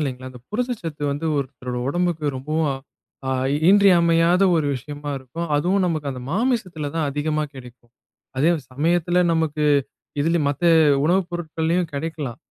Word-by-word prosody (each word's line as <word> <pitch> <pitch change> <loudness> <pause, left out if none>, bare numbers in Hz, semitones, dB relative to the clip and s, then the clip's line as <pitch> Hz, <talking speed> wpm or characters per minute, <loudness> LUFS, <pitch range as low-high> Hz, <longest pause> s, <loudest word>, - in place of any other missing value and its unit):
இல்லைங்களா, 130 -3 -4
அந்த 125 -1 -13
புரதச்சத்து 210 - -3
வந்து 145 +3 -3
ஒருத்தரோட 125 -2 -4
உடம்புக்கு, 170 0 -1
ரொம்பவும் 155 +3 -1 0.6
அ - - +1 0.4
இன்றியமையாத 175 -2 +5
ஒரு 155 - +1
விஷயமா 145 +3 -6
இருக்கும். 150 +7 -6
அதுவும் 185 +6 +1
நமக்கு 155 -4 -2
அந்த 130 -2 -6
மாமிசத்தில 185 - -1
தான் 160 -3 0
அதிகமா 150 +2 -1
கிடைக்கும். 125 -2 -13 0.5
அதே 150 +6 +3 0.2
சமயத்தில 175 +5 +1
நமக்கு 160 -2 0 0.6
இதிலும் 160 0 +1
மத்த 145 +3 -4 0.4
உணவுப் 180 +2 +2
பொருட்கள்லையும் 165 0 -1
கிடைக்கலாம். 145 -4 -4
160 Hz, 130 wpm, -22 LUFS, 145-175 Hz, 0.6 s, இன்றியமையாத